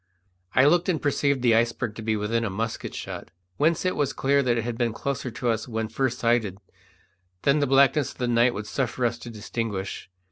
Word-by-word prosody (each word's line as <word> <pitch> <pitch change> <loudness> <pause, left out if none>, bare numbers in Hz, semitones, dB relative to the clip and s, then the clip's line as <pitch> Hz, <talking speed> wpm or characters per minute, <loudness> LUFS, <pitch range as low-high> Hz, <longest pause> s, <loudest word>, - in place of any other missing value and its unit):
I 130 - +6
looked 175 +5 +4
and 165 -4 +1
perceived 140 -2 +1
the 120 -2 +5
iceberg 115 0 +1
to 110 - -8
be 110 0 0
within 115 +3 0
a 110 - -1
musket 110 +4 -4
shot, - - -6 0.3
whence 160 +4 +2
it 185 - +1
was 145 -3 0
clear 140 +1 +2
that 120 -3 +1
it 115 - 0
had 120 0 -3
been 115 -1 0
closer 140 +2 -3
to 120 +1 -2
us 115 -1 -1
when 110 -2 -3
first 120 +2 -1
sighted 115 -5 +1 0.9
than 140 +2 +4
the 145 - +1
blackness 140 +2 +4
of - - -17
the 125 - -1
night 120 +1 +3
would 105 +1 -4
suffer 125 +1 -1
us 120 0 -1
to 120 - -8
distinguish. 105 -4 -4
120 Hz, 215 wpm, -25 LUFS, 115-140 Hz, 0.9 s, I